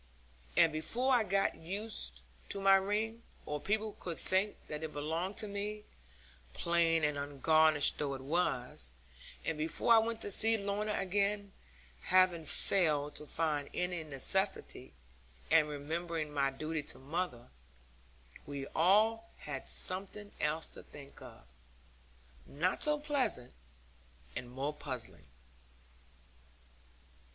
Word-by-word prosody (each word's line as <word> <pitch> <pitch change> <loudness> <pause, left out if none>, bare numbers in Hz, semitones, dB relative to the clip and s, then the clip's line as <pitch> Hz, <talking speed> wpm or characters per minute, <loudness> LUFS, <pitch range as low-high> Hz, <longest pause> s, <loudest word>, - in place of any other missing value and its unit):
And 165 -1 +6
before 245 +12 0
I 240 -3 +5
got 195 -1 +1
used 200 +7 -4 0.3
to 200 - -3
my 195 0 +6
ring, 210 +4 +1 0.2
or 150 -1 -3
people 215 +1 0
could 170 -3 -5
think 195 +3 +1
that 150 0 -5
it 160 -1 -5
belonged 165 +7 -2
to 215 - -2
me 205 +1 -4 0.7
(plain 165 -1 +2
and 150 -1 +1
ungarnished 150 +1 +3
though 140 -2 -1
it 130 - -8
was), 130 - 0 0.5
and 160 -2 -2
before 165 +9 +2
I 225 - +8
went 225 0 -1
to 205 - -2
see 225 +3 +4
Lorna 205 +1 -1
again, 200 +1 0 0.5
having 185 -3 +4
failed 150 -4 +2
to 150 - -7
find 150 -3 0
any 180 -2 -1
necessity, 155 - -1 0.6
and 155 -2 +5
remembering 155 +1 -3
my 140 -1 +2
duty 155 +3 -3
to 145 - -8
mother, 145 -3 -4 1.0
we 140 -1 -4
all 220 +7 +4
had 135 -3 -5
something 200 +2 -1
else 150 +2 0
to - - -10
think 140 -1 -13
of, - - -13 1.0
not 175 +6 -1
so 300 0 +4
pleasant, 285 - 0 0.8
and 125 - -5
more 135 +4 -3
puzzling. 130 - -7
165 Hz, 125 wpm, -34 LUFS, 150-200 Hz, 1.0 s, I